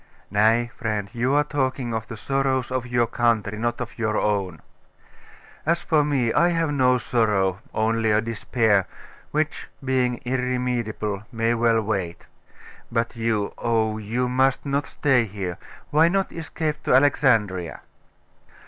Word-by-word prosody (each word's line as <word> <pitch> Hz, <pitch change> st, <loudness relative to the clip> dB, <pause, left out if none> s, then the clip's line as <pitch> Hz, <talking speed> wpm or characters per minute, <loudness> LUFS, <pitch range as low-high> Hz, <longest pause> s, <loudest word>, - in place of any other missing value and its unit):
'Nay, 115 Hz, +3 st, +3 dB
friend, 105 Hz, -4 st, -2 dB
you 125 Hz, +3 st, +1 dB
are 145 Hz, -, +4 dB
talking 130 Hz, -4 st, -2 dB
of 110 Hz, -1 st, -3 dB
the 115 Hz, -, -7 dB
sorrows 135 Hz, +1 st, 0 dB
of 130 Hz, -1 st, -2 dB
your 120 Hz, -1 st, +2 dB
country, 115 Hz, -3 st, 0 dB
not 120 Hz, +1 st, -1 dB
of -, -, -6 dB
your 110 Hz, -2 st, 0 dB
own. 95 Hz, -6 st, -1 dB, 1.0 s
As 170 Hz, +2 st, 0 dB
for 155 Hz, -2 st, +3 dB
me, 135 Hz, -6 st, +1 dB
I 170 Hz, +3 st, +4 dB
have 165 Hz, -3 st, 0 dB
no 130 Hz, -3 st, +3 dB
sorrow 105 Hz, -6 st, +1 dB
only 115 Hz, 0 st, +1 dB
a 105 Hz, 0 st, +4 dB
despair: 110 Hz, -3 st, +1 dB, 0.4 s
which, 155 Hz, 0 st, -2 dB, 0.2 s
being 125 Hz, -2 st, +1 dB
irremediable, 125 Hz, -5 st, -2 dB
may 115 Hz, 0 st, +1 dB
well 115 Hz, -1 st, +2 dB
wait. 95 Hz, -5 st, -3 dB, 0.7 s
But 115 Hz, 0 st, -1 dB
you 115 Hz, -3 st, -1 dB
oh, 110 Hz, -2 st, 0 dB
you 115 Hz, +4 st, -1 dB
must 130 Hz, +2 st, +1 dB
not 140 Hz, +1 st, -1 dB
stay 130 Hz, -5 st, +2 dB
here. 95 Hz, -4 st, -5 dB, 0.3 s
Why 155 Hz, +3 st, +5 dB
not 195 Hz, +2 st, 0 dB
escape 155 Hz, -2 st, -4 dB
to -, -, +4 dB
Alexandria? 115 Hz, -, +2 dB
120 Hz, 140 wpm, -24 LUFS, 110-130 Hz, 1.0 s, Why